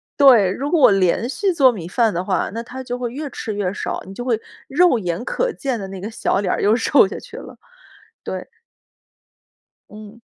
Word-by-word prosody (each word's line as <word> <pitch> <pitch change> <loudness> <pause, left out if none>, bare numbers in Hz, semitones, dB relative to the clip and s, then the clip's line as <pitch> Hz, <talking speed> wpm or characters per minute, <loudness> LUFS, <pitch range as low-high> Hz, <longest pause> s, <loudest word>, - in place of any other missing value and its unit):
对， 240 -10 +6
如 275 +8 -3
果 340 - +2
我 255 - +7
连 195 +4 +2
续 385 +8 0
做 270 -7 +5
米 175 -7 -7
饭 225 +2 +1
的 175 +2 -2
话， 185 -1 -1
那 230 - -4
他 260 +2 -8
就 245 0 -4
会 240 -2 -3
越 290 +3 -5
吃 215 - -5
越 195 -2 -2
少， - - -4
你 190 - -10
就 245 - -6
会 235 -3 0 0.3
肉 295 -4 +3
眼 180 +5 -3
可 - - -1
见 265 - -3
的 195 - -6
那 190 -1 -8
个 205 +4 -5
小 220 - -1
脸 190 -3 0
儿 - - -2
又 210 +3 +4
瘦 240 -2 +4
下 - - -7
去 - - -13
了， - - -10 0.7
对。 - - -5 1.4
嗯。 215 +2 -12
230 Hz, 225 characters per minute, -20 LUFS, 195-260 Hz, 1.4 s, 我